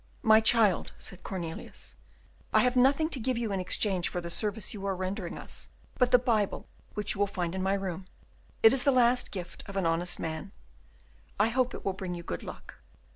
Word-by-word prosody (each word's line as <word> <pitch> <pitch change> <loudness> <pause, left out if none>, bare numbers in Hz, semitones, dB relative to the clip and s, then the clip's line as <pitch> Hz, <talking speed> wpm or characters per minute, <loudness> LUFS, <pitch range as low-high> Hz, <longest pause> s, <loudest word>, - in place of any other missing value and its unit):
"My 220 0 +7
child," 220 -4 +4
said 185 - -8
Cornelius, 170 -4 -7 0.6
"I - - +5
have 250 0 +2
nothing 275 +5 +4
to 280 - -4
give 250 +1 -1
you 230 -3 -2
in 195 - -1
exchange 185 0 +1
for 180 - -3
the 170 -1 -6
service 210 +4 -1
you 200 -2 -7
are 195 - 0
rendering 185 0 -4
us - - -6 0.3
but 250 -1 +4
the 250 - +7
Bible 225 -5 0 0.3
which 210 - 0
you 200 - -9
will 205 - +3
find 180 -3 -3
in 190 - -3
my 190 +1 +1
room; 190 -1 -4 0.6
it 225 +2 +8
is 265 -2 +3
the - - +4
last 245 -1 +3
gift 180 -3 -7
of 200 -1 -6
an 190 - 0
honest 165 +2 +1
man; 160 +5 -5 0.9
I 215 +2 +4
hope 250 +1 0
it - - -9
will 195 - 0
bring 185 -2 -5
you 170 - -7
good 85 - -5
luck." - - -10
200 Hz, 210 wpm, -29 LUFS, 180-235 Hz, 0.9 s, it